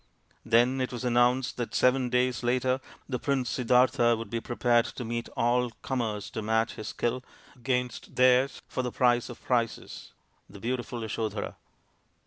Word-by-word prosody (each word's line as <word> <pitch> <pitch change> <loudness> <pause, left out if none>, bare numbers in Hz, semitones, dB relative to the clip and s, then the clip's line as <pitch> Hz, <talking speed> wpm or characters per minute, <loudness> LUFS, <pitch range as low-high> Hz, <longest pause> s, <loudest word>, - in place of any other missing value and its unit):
Then 120 +3 +3
it 130 - -2
was 125 0 -5
announced 125 +1 +2
that 120 -2 -4
seven 125 0 +3
days 125 -1 +1
later 125 +2 +1 0.3
the 125 -3 -2
Prince 130 -3 0
Siddartha 125 -1 +3
would 115 -2 -7
be 115 -1 -2
prepared 120 0 +2
to 125 - -6
meet 115 +1 -3
all 125 +1 +2
comers 110 -6 -2
to 110 - -4
match 110 +1 +1
his 110 - -7
skill 125 +2 -2 0.3
against 125 -1 -3
theirs 130 +1 +3
for - - -2
the 125 -1 -3
prize 120 0 +2
of 120 - -10
prizes, 120 -3 -2 0.4
the 100 +1 -12
beautiful 120 +1 -3
Yasodhara. 110 -1 -3
120 Hz, 155 wpm, -28 LUFS, 115-125 Hz, 0.4 s, Then